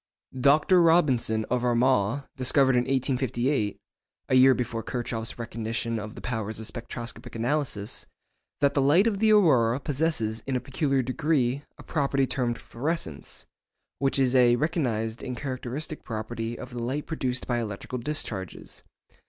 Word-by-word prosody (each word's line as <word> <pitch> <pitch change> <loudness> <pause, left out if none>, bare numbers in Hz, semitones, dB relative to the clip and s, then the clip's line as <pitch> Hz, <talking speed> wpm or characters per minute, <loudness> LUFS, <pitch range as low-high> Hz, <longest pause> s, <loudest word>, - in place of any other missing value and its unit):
Dr. 150 +7 +5
Robinson, 130 -10 +3
of 125 -1 +1
Armagh, 125 0 +2
discovered 130 +1 +3
in 125 0 +2
1858 130 -3 0 0.5
(a 130 - +3
year 130 0 +7
before 120 -2 -3
Kirchhoff's 115 -2 -4
recognition 115 0 -3
of 105 0 -7
the - - -9
powers 110 -3 -3
of 110 - -6
spectroscopic 120 +1 -5
analysis) 120 -3 -2 0.5
that 140 0 +4
the 140 - +2
light 150 +9 +5
of 210 -4 +1
the 220 0 +4
aurora 130 - +4
possesses 135 -7 -1
in 135 - -1
a - - +2
peculiar 135 0 0
degree 135 0 0 0.2
a - - -12
property 140 -3 +1
termed 125 -3 -1
fluorescence, 125 - -4 0.5
which 135 0 +1
is 130 -2 +2
a 125 -2 +5
recognised 120 -7 -1
and 125 -1 -4
characteristic 135 +3 -4
property 115 +1 -4
of 130 - -8
the 120 - -5
light 130 +5 -2
produced 130 -6 -1
by 120 -1 0
electrical 115 +3 -5
discharges. 115 - -4
125 Hz, 145 wpm, -27 LUFS, 115-140 Hz, 0.5 s, year